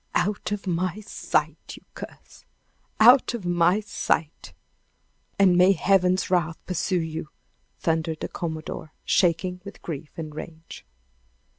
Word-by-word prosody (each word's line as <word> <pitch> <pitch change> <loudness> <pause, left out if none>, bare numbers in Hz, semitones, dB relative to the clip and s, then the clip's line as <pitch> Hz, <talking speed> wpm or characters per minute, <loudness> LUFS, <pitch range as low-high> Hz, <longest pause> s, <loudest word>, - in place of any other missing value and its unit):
"Out 200 +3 0
of 205 0 -3
my 180 +2 -1
sight, 210 - -2
you - - -16
curse! - - -11 0.6
Out 245 +2 +7
of 210 -6 -7
my 175 +3 +3
sight 170 -6 -2 0.9
and 190 -3 +5
may 180 +2 +6
Heaven's 185 0 +2
wrath 170 -3 +1
pursue 180 0 0
you!" 160 -1 -5 0.5
thundered 160 -1 -1
the - - -2
commodore, 160 -1 -6
shaking 180 +1 +1
with 200 - -11
grief 155 -2 -6
and 155 -2 -6
rage. 160 +1 -10
175 Hz, 125 wpm, -25 LUFS, 160-195 Hz, 0.9 s, Out